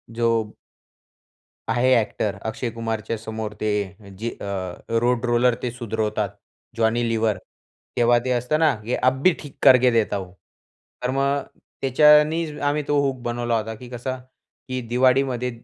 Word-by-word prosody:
जो 115 0 +1 1.4
आहे 125 +3 +3
ॲक्टर 105 -2 -1
अक्षय 115 +2 -3
कुमारच्या 115 -1 -3
समोर 110 -1 -5
ते 110 - 0 0.5
जे 115 +2 -2
अ, - - -6 0.6
रोड 125 0 +1
रोलर 120 +1 +3
ते 125 - -1
सुधरवतात, 110 -3 -2 0.5
जॉनी 115 +1 +1
लीवर. 110 -2 +1 0.6
तेव्हा 120 0 +4
ते 130 - -1
असतं 125 +5 0
ना, 155 -4 +4
की 120 - -1
"अभी 130 +8 +3
ठीक 145 -3 -11
करके 130 -2 +7
देता 115 -3 +1
हूँ." 95 -2 -7 0.7
तर 125 - 0
मग, 140 +1 +1 0.4
त्याच्यानीच 150 +3 +4
आम्ही 145 +1 +1
तो 145 - +2
हूक 135 -2 -1
बनवला 120 -1 -1
होता, 110 +1 -4
की 125 +3 -11
कसं 130 +1 -4 0.5
की 130 0 -2
दिवाळीमध्ये 125 0 +2
120 Hz, 140 wpm, -23 LUFS, 115-130 Hz, 1.4 s, करके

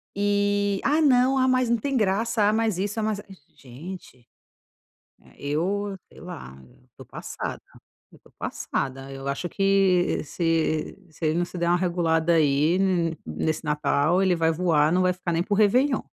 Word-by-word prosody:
Eh: 205 0 +1
"Ah, 300 +3 +3
não, 265 -2 +4
ah, 260 0 +3
mas 255 -2 +2
não 235 - +2
tem 275 +3 -2
graça, 220 +2 +1
ah, - - 0
mas 220 -4 0
isso, 205 +3 -2
ah, - - -2
mas 215 -1 -1
a", - - -12 0.3
gente, 130 -2 -11 1.1
eu 195 +8 -2
sei - - -17
lá, 65 +1 -9 0.4
tô - - -12
passada, - - -6 0.5
eu - - -19
tô - - -23
passada, 135 0 -4
eu 135 0 -7
acho 140 +5 -3
que 195 -2 +2
se 160 -1 -1
se 155 +1 -6
ele 155 +2 +1
não 175 - 0
se 175 0 -9
der 170 0 0
uma 175 - +4
regulada 170 -2 +1
aí, 155 +2 +3
n 175 -4 0
nesse 155 - -2
Natal 150 +4 +1
ele 185 -2 +3
vai 165 0 +2
voar, 160 -3 +2
não 185 +1 +2
vai 185 0 +3
ficar 180 -1 -4
nem 165 - +1
por 205 +2 -1
Réveillon. 250 +7 +3
180 Hz, 175 wpm, -25 LUFS, 160-205 Hz, 1.1 s, não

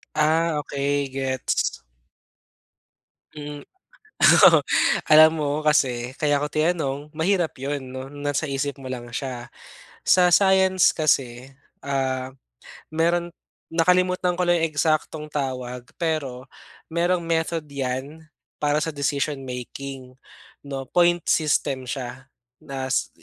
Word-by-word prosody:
Ah, 160 +1 +2
okey 140 0 -1
gets. 130 -1 -2 1.5
Mm. 145 -1 -8 0.9
Oo. - - +5 0.5
Alam 155 +1 +8
mo 145 -2 -1
kasi 130 -4 +1
kaya 145 -2 +1
ko 150 - -2
tinanong 150 -2 -1
mahirap 170 +1 0
'yon 140 +1 -4
'no, 130 +1 -7
nasa 145 +1 -3
isip 140 0 -3
mo 130 - -7
lang 125 -2 -5
siya. 125 -2 -4 0.6
Sa 180 -1 +4
science 190 -1 +5
kasi, 135 -4 0 0.3
ah, 130 -1 -2 0.6
mayro'n 170 +2 0 0.4
nakalimutan 180 +1 +2
ko 180 - 0
lang 175 -1 +2
'yong 165 - +1
eksaktong 155 0 -1
tawag 125 -3 -4
pero 145 -7 -2 0.5
mayroong 175 +1 +1
method 165 -1 -1
'yan 140 +2 -5 0.3
para 150 0 +1
sa 160 +1 -2
decision 140 0 -1
making 130 +1 -7 0.6
'no, 135 -1 -4
point 175 +4 +2
system 135 -4 0
siya. 130 0 -6 0.3
Nas 135 -1 -2
145 Hz, 110 wpm, -23 LUFS, 135-165 Hz, 1.5 s, Alam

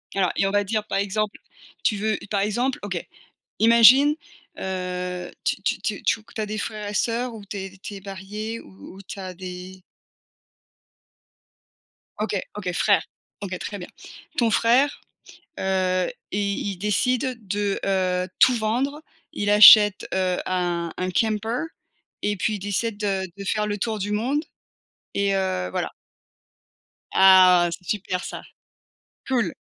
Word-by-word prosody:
Alors 185 -3 +2
et 195 - +2
on - - -1
va 205 0 +2
dire, 210 +1 -2
par - - -2
exemple, 205 +1 -2 0.4
tu 210 - +2
veux 215 0 0
par 200 -2 0
exemple 240 +6 0
OK 185 -4 -3 0.6
imagine, 235 +6 +7 0.4
heu 180 -1 -4
tu - - 0
tu - - -1
tu - - -3
tu 225 - +1
q - - -19
tu 220 - -4
as 210 - -1
des 215 +1 -4
frères 210 -1 -4
et - - -7
sœurs 235 +2 -1
ou 210 -2 -10
tu 200 - -7
es 195 0 -7
tu 205 - -7
es - - -9
marié 205 +4 -6
ou 95 - -14
ou 195 - -11
tu 195 - -9
as 185 -1 -6
des 185 +1 -9 2.4
OK, - - -1 0.2
OK, - - -3
frère. - - +3 0.4
OK 185 -2 -4
très 205 - -5
bien. 180 - -8 0.5
Ton 235 -2 +3
frère, 250 +6 +3 0.6
heu, 185 -1 +1 0.2
i 200 0 -1
il - - -8
décide 250 +5 0
de, 205 +1 -1
heu, 185 -2 0
tout 255 - +6
vendre. 250 +7 -1 0.3
Il 205 0 -1
achète, 210 -1 +8
heu, 185 -1 +1
un 175 -2 -1
un 185 0 -2
camper 220 - 0 0.6
et 205 0 0
puis 215 +3 0
il - - -3
décide 205 +3 -2
de 195 -2 -1
de 200 - -7
faire 210 +2 0
le 205 0 -2
tour 220 +1 -2
du 205 +1 -3
monde 265 +9 0 0.7
et 200 -1 +1
heu 140 - -1
voilà. - - -2 1.2
Ah 185 -2 +7
c'est 180 - -7
super 185 -2 -2
ça. - - -6 0.9
Cool. 255 -3 +1
205 Hz, 155 wpm, -24 LUFS, 185-220 Hz, 2.4 s, achète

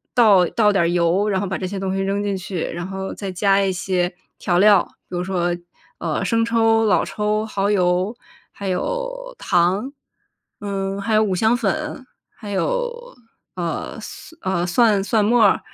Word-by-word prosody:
倒 210 -7 +6
倒 210 -3 +2
点 195 -3 +2
儿 - - +2
油， 175 +4 +2
然 195 -2 +1
后 200 - -2
把 190 - -2
这 185 - -3
些 195 +1 -5
东 190 0 -2
西 195 - -1
扔 200 +1 -1
进 200 -1 -1
去。 185 -2 -5
然 175 +2 -4
后 190 0 -5
再 195 -2 -5
加 195 +2 +2
一 195 -1 +1
些 180 -1 -1 0.3
调 175 -2 +1
料， 205 -2 +6 0.3
比 180 - -4
如 180 - -1
说， 175 -2 -1 0.5
呃， 165 +3 -2
生 230 +4 +1
抽、 225 -1 +3
老 205 - +3
抽、 210 +1 -1
耗 200 -2 -1
油， 185 +2 +1 0.4
还 200 - -7
有， - - -3
糖， 185 +8 +1 0.7
嗯， 195 -1 -3
还 220 +2 -1
有 215 - +5
五 190 -3 0
香 220 +5 +3
粉， 265 +4 -2 0.3
还 210 -3 -8
有， - - -2 0.4
呃 170 -3 -4
蒜， 325 - -10 0.2
呃， 175 - 0
蒜 205 +1 +3
蒜 215 0 +2
末 235 +1 +4
儿， 200 - +4
200 Hz, 195 characters per minute, -21 LUFS, 185-225 Hz, 0.7 s, 倒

